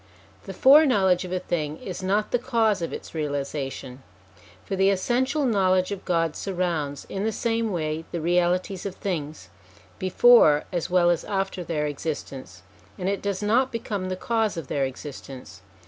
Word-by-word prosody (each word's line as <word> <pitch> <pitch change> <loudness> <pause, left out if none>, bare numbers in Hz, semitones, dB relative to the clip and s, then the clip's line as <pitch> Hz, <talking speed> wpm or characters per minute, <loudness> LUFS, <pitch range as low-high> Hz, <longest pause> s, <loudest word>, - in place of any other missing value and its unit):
The - - -6
fore 290 +4 +7
knowledge 190 -7 +3
of 180 - -8
a 185 - 0
thing 155 -4 -3
is 185 0 -7
not 200 +3 0
the 245 - +2
cause 230 -6 +1
of 165 - -3
its - - -8
realisation; 140 -3 -4 0.6
for 195 - -3
the 190 +1 +3
essential 255 +9 +1
knowledge 185 -5 +2
of 195 -1 -6
God 165 -3 0
surrounds, 170 -7 -2
in 195 - -4
the 220 - 0
same 225 0 -1
way, 160 -2 -2
the 170 - -3
realities 180 +3 0
of 190 - -7
things, 155 - -5 0.5
before 185 -5 +5
as 175 -2 -2
well 175 -1 +4
as 170 - -1
after 195 -2 -2
their 155 -3 -2
existence, 140 - -6 0.3
and 180 - -3
it 200 0 -1
does 200 0 -2
not 245 +5 +2
become 205 -5 -3
the 185 - -2
cause 220 0 -1
of 160 -6 -6
their 140 -1 0
existence. 135 -2 -9
185 Hz, 170 wpm, -25 LUFS, 155-205 Hz, 0.6 s, fore